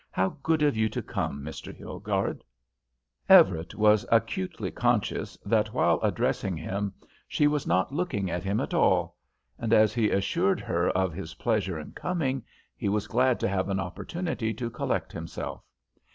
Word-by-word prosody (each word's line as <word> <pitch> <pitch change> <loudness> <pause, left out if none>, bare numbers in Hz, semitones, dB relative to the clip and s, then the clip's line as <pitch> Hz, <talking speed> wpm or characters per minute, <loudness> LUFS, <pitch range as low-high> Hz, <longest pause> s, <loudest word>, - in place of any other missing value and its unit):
How 95 0 +1
good 160 0 +2
of 145 -5 +3
you 110 0 +2
to - - -4
come, 70 0 -3
Mr. 80 - -7
Hilgarde." - - -3 0.9
Everett 85 -3 +6
was 105 0 +4
acutely 115 -5 0
conscious - - 0
that - - +1
while - - +3
addressing 90 -3 0
him 100 +5 -3 0.4
she 150 - +1
was 150 -1 +1
not 95 +8 +1
looking 145 - -1
at 90 +1 -3
him 100 +2 0
at - - -3
all, - - +2 0.4
and, 115 -2 -2
as 110 -1 +5
he 115 -3 +2
assured 170 - +1
her 85 +1 0
of 95 -2 0
his 80 -2 -7
pleasure 105 -7 0
in 75 - -9
coming, 140 -8 -2 0.3
he 105 - -2
was 105 0 0
glad 125 +1 +2
to - - +2
have 95 0 -1
an 95 -1 0
opportunity 110 - -3
to 115 +1 -4
collect - - -2
himself. - - -6
105 Hz, 165 wpm, -27 LUFS, 95-130 Hz, 0.9 s, Everett